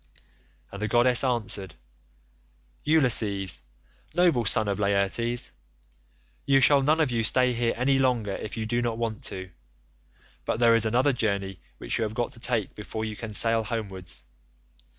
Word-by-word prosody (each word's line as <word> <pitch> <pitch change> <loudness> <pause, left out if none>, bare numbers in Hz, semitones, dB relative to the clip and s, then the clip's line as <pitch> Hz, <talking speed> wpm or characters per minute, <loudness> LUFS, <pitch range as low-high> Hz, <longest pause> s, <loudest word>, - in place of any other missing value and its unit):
"And 100 - -8
the 110 - -1
goddess 120 +2 +4
answered, 105 - -2 1.1
'Ulysses, 110 - +2 0.5
noble 170 -10 +3
son 110 +1 +4
of 100 0 -2
Laertes, 100 +4 +1 0.9
you 135 - +3
shall 140 +1 +5
none 155 +4 +2
of 150 -5 +1
you 115 -1 0
stay 125 +3 +2
here 115 0 -1
any 135 +2 +2
longer 125 -6 0
if 105 +3 -6
you 110 - -3
do 120 +2 -1
not 120 -2 -2
want 115 -2 -4
to, 95 -1 -6 0.9
but 110 - -2
there 120 -1 +5
is 115 -1 +2
another 125 +5 +2
journey 100 -5 -2 0.2
which - - -2
you - - +1
have 110 0 -4
got 120 0 -2
to - - -11
take 115 -4 -1
before 110 +1 -6
you 110 -1 -5
can 110 +1 -7
sail 115 +2 +2
homewards. 100 -5 -5
115 Hz, 160 wpm, -26 LUFS, 105-125 Hz, 1.1 s, shall